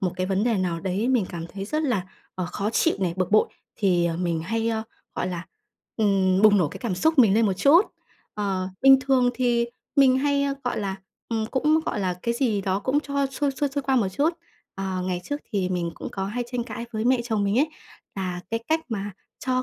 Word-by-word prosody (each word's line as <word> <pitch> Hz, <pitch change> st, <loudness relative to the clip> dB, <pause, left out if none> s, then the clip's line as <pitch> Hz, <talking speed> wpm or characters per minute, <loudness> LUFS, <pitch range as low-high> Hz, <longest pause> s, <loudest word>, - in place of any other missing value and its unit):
một 180 Hz, -2 st, 0 dB
cái 185 Hz, 0 st, -1 dB
vấn 195 Hz, +3 st, +1 dB
đề 230 Hz, -3 st, +2 dB
nào 175 Hz, -3 st, -1 dB
đấy 195 Hz, +6 st, -1 dB
mình 245 Hz, -7 st, +3 dB
cảm 170 Hz, -1 st, -6 dB
thấy 195 Hz, +2 st, -7 dB
rất 305 Hz, +9 st, -1 dB
là, 230 Hz, -11 st, 0 dB, 0.3 s
ờ, 185 Hz, -2 st, -3 dB
khó 200 Hz, +4 st, -2 dB
chịu 325 Hz, -, +2 dB
này, 180 Hz, -3 st, +1 dB
bực 185 Hz, 0 st, -1 dB
bội, 215 Hz, -, +4 dB, 0.3 s
thì, 180 Hz, -5 st, +2 dB
ờ, 165 Hz, -1 st, -1 dB
mình 170 Hz, -2 st, -1 dB
hay, 225 Hz, +6 st, -1 dB
ơ, 220 Hz, -1 st, -1 dB, 0.3 s
gọi 180 Hz, -, -2 dB
là, 175 Hz, -1 st, -4 dB, 0.5 s
ừm, 195 Hz, -3 st, +2 dB
bùng 210 Hz, -1 st, +7 dB
nổ 165 Hz, -, +2 dB
cái -, -, -9 dB
cảm 230 Hz, -7 st, -2 dB
xúc 320 Hz, -, +1 dB
mình 220 Hz, -6 st, +6 dB
lên 225 Hz, 0 st, +4 dB
một 195 Hz, -, +2 dB
chút. 300 Hz, -, +6 dB, 0.5 s
Ờ, 195 Hz, -3 st, -1 dB
bình 270 Hz, 0 st, +8 dB
thường 260 Hz, -2 st, +3 dB
thì 240 Hz, -2 st, +1 dB, 0.3 s
mình 260 Hz, -2 st, +6 dB
hay, 280 Hz, 0 st, +1 dB
ơ, 275 Hz, -, 0 dB
gọi 245 Hz, -, -1 dB
là, 195 Hz, -2 st, -3 dB, 0.3 s
ừm, 225 Hz, -1 st, -1 dB
cũng 300 Hz, +6 st, +2 dB
gọi 210 Hz, -, -1 dB
là 185 Hz, -2 st, 0 dB
cái 235 Hz, -, 0 dB
gì 235 Hz, -5 st, +1 dB
đó 190 Hz, 0 st, 0 dB
cũng 265 Hz, +7 st, +1 dB
cho 280 Hz, -2 st, -1 dB
xuôi, 275 Hz, +2 st, -1 dB
xuôi, 280 Hz, +2 st, -1 dB
xuôi 280 Hz, +1 st, -3 dB
qua 270 Hz, 0 st, +1 dB
một 210 Hz, -6 st, +2 dB
chút. 285 Hz, -, +1 dB, 0.4 s
Ờ, 190 Hz, -1 st, -3 dB
ngày 180 Hz, -1 st, -2 dB
trước 290 Hz, +1 st, -3 dB
thì 190 Hz, -3 st, 0 dB
mình 175 Hz, -2 st, -1 dB
cũng -, -, -6 dB
có 195 Hz, -, -3 dB
hay 240 Hz, +5 st, -3 dB
tranh 245 Hz, -1 st, -1 dB
cãi 235 Hz, -1 st, -6 dB
với 220 Hz, 0 st, -2 dB
mẹ 255 Hz, 0 st, +3 dB
chồng 220 Hz, -4 st, 0 dB
mình 200 Hz, +4 st, +1 dB
ấy, 300 Hz, +4 st, +3 dB, 0.5 s
là 185 Hz, -2 st, -3 dB
cái 230 Hz, 0 st, -1 dB
cách 320 Hz, +1 st, +2 dB
mà 205 Hz, -3 st, -3 dB, 0.4 s
cho 255 Hz, 0 st, +1 dB
215 Hz, 240 wpm, -25 LUFS, 185-260 Hz, 0.5 s, bình